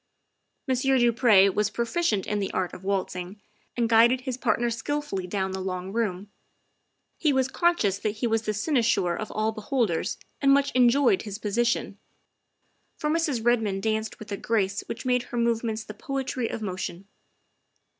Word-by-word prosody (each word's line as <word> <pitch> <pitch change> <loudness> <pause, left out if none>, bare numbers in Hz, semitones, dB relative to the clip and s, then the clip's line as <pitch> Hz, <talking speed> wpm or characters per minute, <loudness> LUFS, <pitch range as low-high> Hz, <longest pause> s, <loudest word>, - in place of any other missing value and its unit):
Monsieur 265 +1 +2
du 240 -1 +4
Pre 215 -5 +6
was 210 0 +1
proficient 230 - 0
in 210 - -1
the 195 - -2
art 185 -1 -1
of 185 - -10
waltzing 190 0 -3 0.4
and 235 -1 +2
guided 235 +3 +5
his 255 -1 -3
partner 240 -1 0
skilfully 290 -6 -3
down 190 0 -2
the 190 0 -4
long 185 0 -4
room. 205 -3 -2 0.9
He 305 - +3
was 265 -1 +2
conscious 265 - +1
that 210 0 -2
he 220 - -2
was 225 -1 +1
the 215 -1 -2
cynosure 215 - +1
of 215 - -5
all 215 +1 0
be 220 -1 -8
holders 220 - 0 0.2
and 275 -1 +5
much 280 0 +3
enjoyed 250 -3 +4
his 205 -2 -6
position, 230 +2 -1 1.0
for 300 - -1
Mrs. 305 -8 0
Red 240 -1 +4
moned 195 -3 -2
danced 220 0 -1
with 215 -1 -11
a 200 - -2
grace 205 -3 0
which 235 - -6
made 250 -1 +2
her 240 - -4
movements 230 -2 0
the 210 - -9
poetry 265 -1 -3
of 220 - -5
motion. 185 -1 -5
225 Hz, 175 wpm, -26 LUFS, 200-250 Hz, 1.0 s, Pre